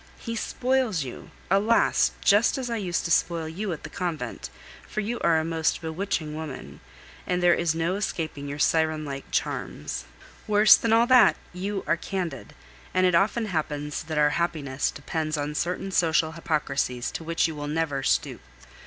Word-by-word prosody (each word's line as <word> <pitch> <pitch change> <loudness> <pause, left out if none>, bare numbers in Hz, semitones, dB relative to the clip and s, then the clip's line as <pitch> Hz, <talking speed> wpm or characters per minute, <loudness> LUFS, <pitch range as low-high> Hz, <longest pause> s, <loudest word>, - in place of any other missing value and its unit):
He 230 -1 -5
spoils 250 - 0
you, 125 - -9 0.2
alas! 210 +4 +3
just 205 +6 +4
as 250 -3 -3
I 230 - 0
used 180 -5 -2
to 170 - -2
spoil 165 -1 +1
you 190 +5 -4
at 160 - -6
the 155 - -7
convent, 160 -10 -4 0.4
for - - -3
you 225 +3 -2
are 165 - +3
a 160 - -2
most 160 -1 0
bewitching 160 -1 -3
woman, 155 -3 -7 0.5
and 180 0 0
there 175 -1 +6
is 170 -2 0
no 165 +2 0
escaping 160 -8 -3
your 145 - -5
siren 155 0 +1
like 140 -1 -6
charms. 75 -4 -3 0.4
Worse 210 0 +7
than 230 - -1
all, 230 +1 +5 0.5
you 195 +2 -3
are 170 - +1
candid, 170 -7 -5 0.4
and 185 - +4
it 180 - +3
often 215 +6 +2
happens 150 -5 -3
that 155 -1 -5
our 150 0 +4
happiness 145 -6 -1
depends 155 +2 -3
on 145 +1 -2
certain 180 +5 -2
social 160 -3 +2
hypocrisies 140 -6 -1
to - - -6
which 165 +1 +1
you 160 - -5
will 145 -1 -5
never 150 -2 -1
stoop. - - 0
165 Hz, 170 wpm, -26 LUFS, 150-195 Hz, 0.5 s, Worse